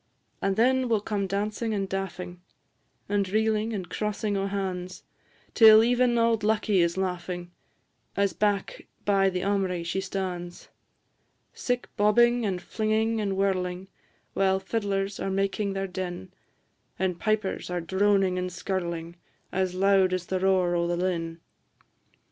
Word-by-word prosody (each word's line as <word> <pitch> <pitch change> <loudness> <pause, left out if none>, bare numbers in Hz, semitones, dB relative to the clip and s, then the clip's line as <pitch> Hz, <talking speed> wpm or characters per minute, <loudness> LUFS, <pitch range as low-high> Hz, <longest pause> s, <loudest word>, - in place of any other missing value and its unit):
And 195 0 +1
then 255 +3 +3
will 225 -2 +3
come 200 -1 -2
dancing 210 +3 -2
and 195 -1 -1
daffing, 185 -2 -5 0.7
And 200 -1 0
reelin' 220 +1 +1
and 190 -5 -4
crossin' 210 -1 -2
o' 195 0 0
han's, 185 -2 -4 0.5
Till 220 -1 +8
even 245 0 +3
auld 230 -1 +2
Lucky 215 -2 +2
is 170 +1 +2
laughing, 180 -1 -3 0.7
As 200 -3 +2
back 205 0 -1 0.2
by 195 -1 +3
the 180 -1 -3
aumry 190 -3 0
she 190 +3 -1
stan's. 185 -2 -5 0.8
Sic 245 -1 -2
bobbing, 235 +3 +4
and 185 -2 -3
flinging, 220 +1 0
and 195 -2 -1
whirling, 185 -1 -1 0.4
While 190 0 +2
fiddlers 195 -1 -2
are - - -2
making 195 +1 -1
their 195 0 -2
din; 185 0 -6 0.6
And 180 -2 -1
pipers 215 -4 -1
are 180 0 -1
droning 190 +1 +2
and 180 0 -3
skirling, 170 -2 -4 0.3
As 185 -1 -1
loud 190 -1 +3
as 185 -1 -2
the 185 0 -2
roar 185 -2 +2
o' 170 0 +1
the 175 0 -1
linn. 170 -2 -2
195 Hz, 140 wpm, -27 LUFS, 180-210 Hz, 0.8 s, Till